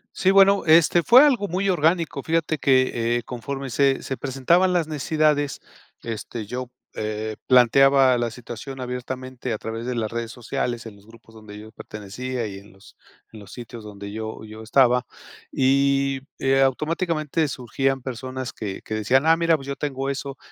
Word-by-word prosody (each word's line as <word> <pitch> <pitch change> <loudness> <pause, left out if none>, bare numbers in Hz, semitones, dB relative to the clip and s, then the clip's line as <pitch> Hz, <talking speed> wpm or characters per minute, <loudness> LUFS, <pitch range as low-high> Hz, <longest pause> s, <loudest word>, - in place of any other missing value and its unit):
Sí, 190 - +2
bueno, 195 0 +5
este, 165 +2 +5
fue 250 - +7
algo 245 -8 +2
muy 190 +3 -1
orgánico. 165 -4 +1
Fíjate 160 -1 -1
que, 120 -3 +2
eh, 120 - -4
conforme 135 +2 -6
se 135 +2 +2
se 135 - -3
presentaban 145 +9 +1
las 170 -3 +1
necesidades, 150 -1 0 0.4
este, 115 -1 -6
yo, 125 +3 -5 0.3
eh, 110 0 -4
planteaba 130 +1 +5
la 120 -1 -1
situación 125 +3 -9
abiertamente 125 0 -5
a 110 - -1
través 115 +3 -6
de 125 - -2
las 110 -2 -2
redes 115 0 -4
sociales 120 -1 -4
en 105 -2 -9
los 100 +1 -21
grupos 115 0 -18
donde 110 -2 -12
yo 110 +1 -11
pertenecía 115 +4 -6
y 95 -2 -7
en 100 +2 -17
los 95 +1 -19 0.4
en 110 - -11
los 100 - -13
sitios 120 -2 -9
donde 100 -1 -9
yo 110 +1 -6
yo 110 +1 -10
estaba 125 +2 +3 0.5
y, 135 0 +2 0.2
eh, 135 0 +2
automáticamente 155 +2 0
surgían 135 +1 -2
personas 130 0 -5
que 100 -3 -6
que - - -6
decían: 125 +7 +2
"Ah, 165 0 +6
mira, 165 -1 +3
pues 135 -3 -8
yo 140 - -3
tengo 135 -2 -3
eso 140 0 -6
130 Hz, 175 wpm, -23 LUFS, 115-145 Hz, 0.5 s, fue